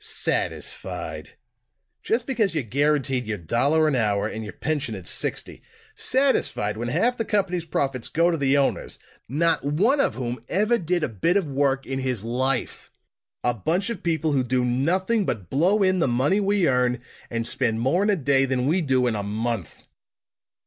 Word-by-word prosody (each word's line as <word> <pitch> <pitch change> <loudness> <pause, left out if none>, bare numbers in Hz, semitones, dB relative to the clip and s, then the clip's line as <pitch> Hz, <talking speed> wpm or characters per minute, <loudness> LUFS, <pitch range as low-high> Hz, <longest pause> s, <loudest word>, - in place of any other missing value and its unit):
"Satisfied! - - -3 0.7
Just 230 +2 0
because 220 -9 0
you're 155 - 0
guaranteed 135 0 0
your 105 -1 -2
dollar 140 - +2
an 150 - +1
hour, 105 -3 +1
and 110 0 -5
your 105 - -6
pension 145 -7 -2
at 95 -3 -9
sixty! - - -2 0.3
Satisfied, 255 - +1
when 120 +2 -4
half 230 - +1
the - - +2
company's 190 -6 -1
profits 135 -6 -1
go 170 +2 +2
to 165 - -1
the 140 -1 +2
owners, 140 - 0 0.3
not 165 +5 +1
one 195 - +2
of - - +2
whom 125 -1 -4
ever 215 +5 +2
did 175 -1 -1
a - - +2
bit 130 - +1
of 195 - 0
work 135 -1 0
in 135 0 -3
his 130 -5 -2
life! 125 +2 -1 0.5
A 120 - +2
bunch 175 - -1
of 230 - -6
people 160 -2 0
who 135 -3 +2
do 125 0 0
nothing 185 - +1
but 100 - -4
blow 185 +9 +3
in 185 -1 +2
the 165 - +2
money 130 +11 +2
we 200 -3 +2
earn, 125 -1 +2 0.3
and 115 0 -2
spend 115 -3 0
more 135 +10 +2
in 205 - +2
a 205 - +4
day 135 -4 +2
than 130 -1 -1
we 170 +6 +2
do 130 -4 +2
in 120 - +1
a 105 - -2
month!" 105 -3 -4
140 Hz, 185 wpm, -24 LUFS, 120-180 Hz, 0.7 s, a